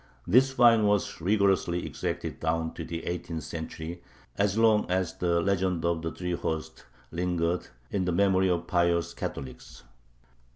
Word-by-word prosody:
This 130 Hz, +9 st, +5 dB
fine 115 Hz, -4 st, +5 dB
was 105 Hz, -4 st, 0 dB
rigorously 95 Hz, -2 st, +2 dB
exacted -, -, -4 dB
down 80 Hz, 0 st, -1 dB
to -, -, -6 dB
the 85 Hz, 0 st, -6 dB
eighteenth 85 Hz, -2 st, -4 dB
century, 80 Hz, +1 st, -6 dB, 0.3 s
as 100 Hz, +1 st, +1 dB
long 110 Hz, -3 st, +4 dB
as 90 Hz, -2 st, 0 dB
the 85 Hz, -1 st, +2 dB
legend 90 Hz, -2 st, 0 dB
of 85 Hz, -1 st, +1 dB
the 80 Hz, 0 st, -3 dB
three 90 Hz, 0 st, -4 dB
hosts 80 Hz, -2 st, -4 dB, 0.3 s
lingered 85 Hz, 0 st, -1 dB, 0.2 s
in 95 Hz, -2 st, 0 dB
the 90 Hz, -, 0 dB
memory 95 Hz, +1 st, +3 dB
of 85 Hz, -1 st, 0 dB
pious 85 Hz, -1 st, +1 dB
Catholics. 65 Hz, -2 st, -7 dB
90 Hz, 150 wpm, -28 LUFS, 85-100 Hz, 0.3 s, This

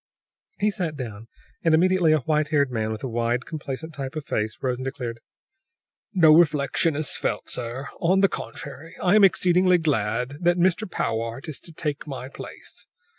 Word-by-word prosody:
He 210 Hz, +1 st, +2 dB
sat 175 Hz, -6 st, -2 dB
down, 115 Hz, -4 st, -7 dB, 0.4 s
and 165 Hz, -1 st, +5 dB
immediately 180 Hz, -1 st, +4 dB
a 155 Hz, -2 st, +3 dB
white 150 Hz, +2 st, +1 dB
haired 145 Hz, -3 st, +2 dB
man 110 Hz, -2 st, -1 dB
with 110 Hz, -, -5 dB
a -, -, -1 dB
wide, 120 Hz, +1 st, -1 dB
complacent 155 Hz, 0 st, -6 dB
type 135 Hz, 0 st, -6 dB
of 155 Hz, -2 st, -4 dB
face 110 Hz, -1 st, -2 dB
arose 125 Hz, -1 st, 0 dB
and 130 Hz, -, -5 dB
declared: 125 Hz, -3 st, -4 dB, 0.9 s
"No 165 Hz, -6 st, +6 dB
reflection 150 Hz, -1 st, +3 dB
is 150 Hz, -1 st, 0 dB
felt, -, -, -2 dB
sir. 125 Hz, +2 st, -4 dB
On 185 Hz, +3 st, +3 dB
the 195 Hz, -, +6 dB
contrary, 155 Hz, -2 st, -7 dB
I 180 Hz, -, +2 dB
am 215 Hz, -, +6 dB
exceedingly 180 Hz, -1 st, +5 dB
glad 125 Hz, -3 st, -1 dB
that 175 Hz, +1 st, +3 dB
Mr. 185 Hz, +3 st, +2 dB
Powart 115 Hz, -1 st, -3 dB
is 155 Hz, -, -5 dB
to 170 Hz, -, -10 dB
take 150 Hz, -1 st, -4 dB
my 130 Hz, -2 st, -6 dB
place. -, -, -10 dB
150 Hz, 175 wpm, -24 LUFS, 125-170 Hz, 0.9 s, No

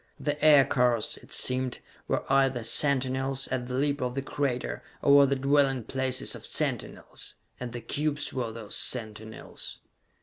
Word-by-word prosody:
The 145 Hz, 0 st, -3 dB
aircars, 125 Hz, -6 st, +4 dB
it -, -, -18 dB
seemed, 130 Hz, -1 st, 0 dB, 0.3 s
were -, -, 0 dB
either 135 Hz, -3 st, +2 dB
sentinels, 135 Hz, +1 st, +1 dB
at 125 Hz, -1 st, -2 dB
the 125 Hz, -, -4 dB
lip 145 Hz, +2 st, 0 dB
of 125 Hz, 0 st, -2 dB
the 135 Hz, -, -2 dB
crater, 125 Hz, -, -2 dB, 0.2 s
or 140 Hz, -, +5 dB
were 140 Hz, 0 st, +8 dB
the 140 Hz, -, +1 dB
dwelling 135 Hz, -2 st, +2 dB
places 130 Hz, +2 st, -1 dB
of -, -, -9 dB
sentinels -, -, -4 dB, 0.2 s
and 125 Hz, -1 st, -5 dB
the 120 Hz, 0 st, -6 dB
cubes 145 Hz, +4 st, -2 dB
were 120 Hz, -3 st, -2 dB
those 110 Hz, -2 st, -5 dB
sentinels! 110 Hz, -2 st, -2 dB
130 Hz, 155 wpm, -28 LUFS, 125-140 Hz, 0.3 s, were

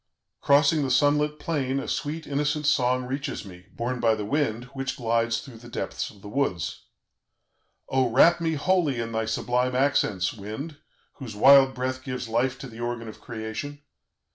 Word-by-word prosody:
Crossing 145 Hz, +2 st, +4 dB
the 135 Hz, -, -1 dB
sun 145 Hz, +3 st, +4 dB
lit 150 Hz, 0 st, -1 dB
plain, 140 Hz, -4 st, -1 dB
a -, -, -5 dB
sweet, 155 Hz, +2 st, -3 dB
innocent 145 Hz, +1 st, -1 dB
song 130 Hz, -3 st, +2 dB
reaches 135 Hz, -1 st, -4 dB
me, 90 Hz, -1 st, -13 dB
borne 125 Hz, +2 st, -2 dB
by 115 Hz, -2 st, +3 dB
the 105 Hz, -1 st, -4 dB
wind, 120 Hz, -2 st, 0 dB
which 135 Hz, 0 st, -3 dB
glides 115 Hz, -1 st, +1 dB
through 115 Hz, -3 st, -12 dB
the 120 Hz, +1 st, -12 dB
depths -, -, -4 dB
of 100 Hz, -, -17 dB
the -, -, -8 dB
woods. 105 Hz, -7 st, -2 dB, 1.0 s
"Oh, 130 Hz, -2 st, +2 dB
wrap 170 Hz, +8 st, +5 dB
me 160 Hz, -1 st, 0 dB
wholly 155 Hz, -4 st, +1 dB
in 115 Hz, 0 st, -3 dB
thy 110 Hz, 0 st, -1 dB
sublime 125 Hz, +3 st, 0 dB
accents, 125 Hz, -8 st, +1 dB
wind, 110 Hz, +9 st, -7 dB, 0.4 s
whose 120 Hz, -6 st, -8 dB
wild 135 Hz, +3 st, +7 dB
breath 130 Hz, +1 st, -3 dB
gives 125 Hz, -2 st, -4 dB
life 125 Hz, +3 st, 0 dB
to 135 Hz, -, -6 dB
the 115 Hz, -1 st, -12 dB
organ 120 Hz, -1 st, -3 dB
of 110 Hz, -, -10 dB
Creation! 115 Hz, +6 st, -6 dB
130 Hz, 175 wpm, -26 LUFS, 115-145 Hz, 1.0 s, wild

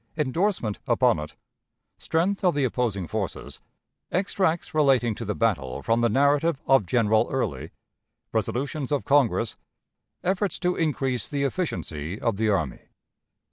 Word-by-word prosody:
Endorsement 150 Hz, -, 0 dB
upon -, -, +3 dB
it. 75 Hz, +1 st, -7 dB, 0.6 s
Strength 180 Hz, +5 st, 0 dB
of 180 Hz, -5 st, +3 dB
the 145 Hz, -, +1 dB
Opposing 115 Hz, -7 st, -1 dB
Forces. 100 Hz, +1 st, -5 dB, 0.5 s
Extracts 180 Hz, -2 st, 0 dB
relating 135 Hz, -7 st, +3 dB
to 115 Hz, -, -6 dB
the 105 Hz, -, -2 dB
Battle, 80 Hz, -, -1 dB
from 115 Hz, +1 st, +2 dB
the 120 Hz, -, +3 dB
Narrative 145 Hz, +5 st, +2 dB
of 135 Hz, -8 st, +4 dB
General 110 Hz, -1 st, +3 dB
Early. 80 Hz, -, -2 dB, 0.6 s
Resolutions 125 Hz, -, -2 dB
of 145 Hz, -, 0 dB
Congress. 130 Hz, -5 st, +2 dB, 0.7 s
Efforts 190 Hz, +2 st, 0 dB
to 180 Hz, -1 st, 0 dB
increase 135 Hz, -6 st, 0 dB
the 140 Hz, -1 st, -1 dB
Efficiency 95 Hz, -, -3 dB
of 115 Hz, -4 st, -1 dB
the 110 Hz, 0 st, +1 dB
Army. 80 Hz, -11 st, 0 dB
125 Hz, 135 wpm, -25 LUFS, 105-155 Hz, 0.7 s, of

